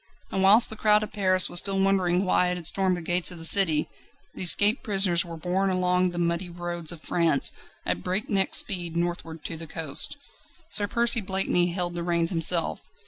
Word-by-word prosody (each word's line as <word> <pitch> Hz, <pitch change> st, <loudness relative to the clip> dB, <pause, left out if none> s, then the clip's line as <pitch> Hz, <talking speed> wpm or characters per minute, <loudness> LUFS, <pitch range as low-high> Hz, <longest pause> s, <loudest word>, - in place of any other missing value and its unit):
And 190 Hz, -, -1 dB
whilst 205 Hz, +5 st, +5 dB
the -, -, -7 dB
crowd 210 Hz, 0 st, +2 dB
of 215 Hz, -, -8 dB
Paris 185 Hz, -2 st, +2 dB
was 175 Hz, -, +3 dB
still 195 Hz, 0 st, -2 dB
wondering 190 Hz, -1 st, 0 dB
why 180 Hz, -1 st, +1 dB
it 180 Hz, 0 st, -3 dB
had 175 Hz, -, -10 dB
stormed 185 Hz, +1 st, +1 dB
the 175 Hz, -, -8 dB
gates 175 Hz, +1 st, +1 dB
of 180 Hz, -, -9 dB
the 165 Hz, -, -2 dB
city, 165 Hz, -5 st, +5 dB, 0.5 s
the -, -, -9 dB
escaped 205 Hz, +5 st, +4 dB
prisoners 195 Hz, -4 st, +1 dB
were 170 Hz, -1 st, -10 dB
borne 185 Hz, +4 st, -2 dB
along 180 Hz, 0 st, 0 dB
the 175 Hz, -, -8 dB
muddy 170 Hz, +1 st, -2 dB
roads 175 Hz, -1 st, -4 dB
of 170 Hz, -2 st, -10 dB
France 165 Hz, -5 st, +1 dB, 0.3 s
at 90 Hz, -, -3 dB
breakneck 195 Hz, -, -1 dB
speed 175 Hz, -4 st, +1 dB
northward 170 Hz, -2 st, -5 dB
to 165 Hz, -, -5 dB
the 165 Hz, 0 st, -9 dB
coast. 155 Hz, -, -1 dB, 0.5 s
Sir 205 Hz, -1 st, 0 dB
Percy 235 Hz, +1 st, +1 dB
Blakeney 190 Hz, -2 st, -1 dB
held 175 Hz, 0 st, -4 dB
the 170 Hz, -, -5 dB
reins 170 Hz, 0 st, 0 dB
himself. 165 Hz, -1 st, +2 dB
180 Hz, 195 wpm, -24 LUFS, 170-195 Hz, 0.5 s, whilst